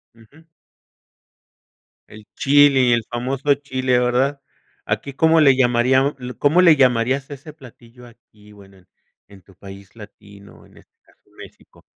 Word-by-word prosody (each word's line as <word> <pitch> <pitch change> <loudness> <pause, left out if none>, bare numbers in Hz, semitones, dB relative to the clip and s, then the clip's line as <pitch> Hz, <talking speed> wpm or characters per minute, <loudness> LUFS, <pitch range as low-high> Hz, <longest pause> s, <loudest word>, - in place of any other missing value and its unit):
Ujú. 115 +8 -22 1.6
El 105 0 -16
chili, 135 -3 +3
el 115 -1 -1
famoso 130 +4 -2
chile, 130 -3 -2
¿verdad? 130 +3 -1 0.4
¿Aquí 140 - -5
cómo 160 +4 +2
le 140 -4 +4
llamaríam 130 +2 +1 0.2
cómo 155 +5 +2
le 170 -4 +5
llamarías 130 0 0
a 145 - -8
ese 145 +3 -15
platillo 125 -4 -18
aquí, 105 -3 -22
bueno, 100 -1 -19
en 90 -1 -26 0.4
en 100 -1 -18
tu 95 +2 -23
país 100 +1 -15
latino, 100 -2 -17
en - - -24
este - - -23
caso, - - -30 0.2
México? - - -17
125 Hz, 140 wpm, -19 LUFS, 110-140 Hz, 1.6 s, le